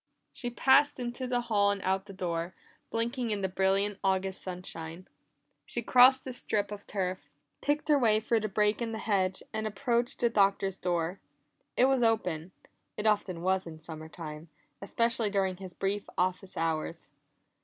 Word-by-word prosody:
She 245 - -4
passed 270 +4 +4
into 245 +1 -3
the 245 -1 +1
hall 210 -4 +2
and 200 0 0
out 190 +1 0
the - - -8
door, 175 -1 -3 0.3
blinking 235 +1 -1
in 210 -2 -1
the 190 - +1
brilliant 195 +2 +1
August 190 0 0
sunshine. 180 -1 -7 0.6
She 240 - -4
crossed 255 +3 +6
the 260 - -4
strip 210 -4 -1
of 205 -1 -8
turf, 185 -2 -3 0.3
picked 290 +1 0
her 295 -2 +5
way 220 -4 +4
through 225 +1 +1
the 215 0 -2
break 210 +3 +2
in 230 -1 -2
the - - -3
hedge, 190 -4 0
and 220 0 -1
approached 240 +2 -1
the 240 - +4
Doctor's 195 -2 +2
door. 175 +1 -1 0.6
It 250 - +6
was 265 -1 +3
open; 185 -7 +1 0.5
it 210 - -3
often 200 -5 +1
was 190 0 +1
in 160 -1 -8
summer 160 0 -8
time, 155 -1 -8 0.3
especially 230 +2 0
during 190 -2 0
his 185 -2 -9
brief 200 +1 -2
office 185 +1 -1
hours. 165 -1 -2
200 Hz, 170 wpm, -30 LUFS, 185-230 Hz, 0.6 s, crossed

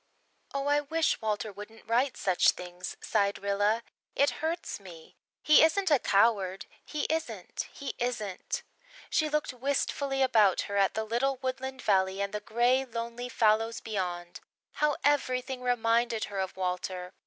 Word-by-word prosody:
"Oh, 275 0 -2
I 290 0 +3
wish 320 +1 0
Walter 215 0 -2
wouldn't 210 +3 -11
write 245 +4 +1
such 185 -2 +3
things," 180 +1 -7
sighed 200 -2 +1
Rilla. 205 +3 +1 0.3
"It 280 - +3
hurts 330 -4 -2
me. 170 -5 -13 0.3
He 300 - +7
isn't 350 +3 +3
a 290 - +6
coward 195 -3 +2 0.2
he 300 -2 -4
isn't 320 0 -3
he 280 - -6
isn't!" 215 -6 -3 0.5
She 310 -1 +2
looked 300 -3 -1
wistfully 270 +1 0
about 215 -7 +4
her 200 - -5
at 195 -1 +3
the 220 - 0
little 245 +5 0
woodland 260 0 -4
valley 190 -1 +2
and 200 0 -2
the 210 - -1
grey, 240 +5 +2
lonely 235 0 -5
fallows 225 -1 +2
beyond. 180 -5 -4 0.3
How 300 -1 +1
everything 260 -3 +1
reminded 235 -2 +1
her 200 -1 -4
of 190 0 -3
Walter! 180 0 -3
230 Hz, 150 wpm, -29 LUFS, 200-270 Hz, 0.5 s, He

